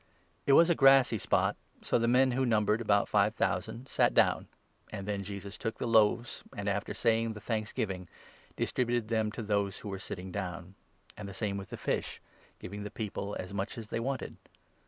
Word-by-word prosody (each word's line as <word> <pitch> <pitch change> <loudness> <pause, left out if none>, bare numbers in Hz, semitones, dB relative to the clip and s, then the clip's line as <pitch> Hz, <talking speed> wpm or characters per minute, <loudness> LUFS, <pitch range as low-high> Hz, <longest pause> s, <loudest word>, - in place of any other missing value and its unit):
ic - - -36
It 140 - +6
was 165 +4 +7
a - - +6
grassy 135 -6 +5
spot; - - +1 0.3
so - - +2
the 115 - +1
men, 130 +2 +4
who 130 +2 +1
numbered 110 -2 +2
about 100 -3 +3
five 105 +1 +2
thousand, 125 +4 -1
sat - - +2
down, - - +3 0.4
and 100 -2 -6
then 100 -1 -1
Jesus 100 +1 -7
took 115 -1 -3
the - - -3
loaves, 115 +1 +3 0.2
and, 100 0 -3
after 100 0 -1
11 - - -4
saying 115 -1 +2
the 105 - -8
thanksgiving, 105 -4 -3 0.5
distributed 120 -3 0
them 110 -2 +1
to 115 - -5
those 100 -2 0
who 105 - -7
were 95 -1 -4
sitting 95 -2 -6
down; 90 -1 -5 0.4
and 105 -2 -7
the 95 - -9
same 100 -1 -2
with 100 -1 -6
the - - -6
fish, - - -2 0.4
giving 100 +3 -7
the 105 - -5
people 105 -1 -4
as 95 +1 -6
much 100 +3 -3
as 110 -2 -7
they - - -1
wanted. 130 +3 -3
105 Hz, 200 wpm, -31 LUFS, 100-115 Hz, 0.5 s, was